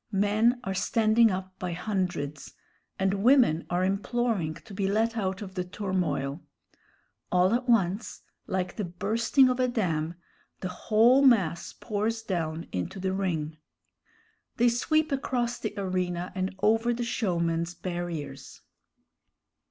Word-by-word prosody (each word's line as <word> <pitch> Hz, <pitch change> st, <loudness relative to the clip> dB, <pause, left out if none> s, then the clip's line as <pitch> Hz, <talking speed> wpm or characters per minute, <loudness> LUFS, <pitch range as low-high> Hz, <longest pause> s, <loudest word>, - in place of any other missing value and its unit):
Men 215 Hz, +5 st, +3 dB
are 195 Hz, -, -2 dB
standing 220 Hz, +3 st, +3 dB
up 185 Hz, -1 st, -5 dB
by 180 Hz, -1 st, -3 dB
hundreds, 180 Hz, -6 st, -3 dB, 0.4 s
and 195 Hz, +1 st, 0 dB
women 240 Hz, -, +4 dB
are 175 Hz, +1 st, +1 dB
imploring 200 Hz, -4 st, -1 dB
to 205 Hz, +5 st, -13 dB
be 195 Hz, 0 st, -1 dB
let 220 Hz, +3 st, +1 dB
out 195 Hz, -2 st, -2 dB
of 190 Hz, -2 st, -9 dB
the 185 Hz, -1 st, -2 dB
turmoil. 180 Hz, -6 st, -2 dB, 0.9 s
All 180 Hz, +3 st, +4 dB
at 250 Hz, +1 st, -1 dB
once, 200 Hz, -2 st, +1 dB, 0.2 s
like 185 Hz, -1 st, -2 dB
the 210 Hz, -, -1 dB
bursting 220 Hz, +9 st, +2 dB
of 255 Hz, 0 st, 0 dB
a 255 Hz, -, +3 dB
dam, 170 Hz, -9 st, -1 dB, 0.5 s
the 185 Hz, -, -3 dB
whole 225 Hz, +8 st, +4 dB
mass 195 Hz, -, +3 dB
pours 225 Hz, +1 st, -2 dB
down 165 Hz, -5 st, -2 dB
into 90 Hz, -, -4 dB
the 190 Hz, 0 st, -1 dB
ring. 160 Hz, -5 st, -2 dB, 1.0 s
They 240 Hz, +1 st, +5 dB
sweep 310 Hz, +6 st, +1 dB
across 245 Hz, -3 st, -1 dB
the 215 Hz, -2 st, -4 dB
arena 180 Hz, -2 st, -2 dB
and 190 Hz, 0 st, -3 dB
over 225 Hz, +3 st, +3 dB
the 240 Hz, -, -2 dB
showman's 170 Hz, -6 st, -1 dB
barriers. 175 Hz, -4 st, -6 dB
195 Hz, 135 wpm, -28 LUFS, 175-230 Hz, 1.0 s, They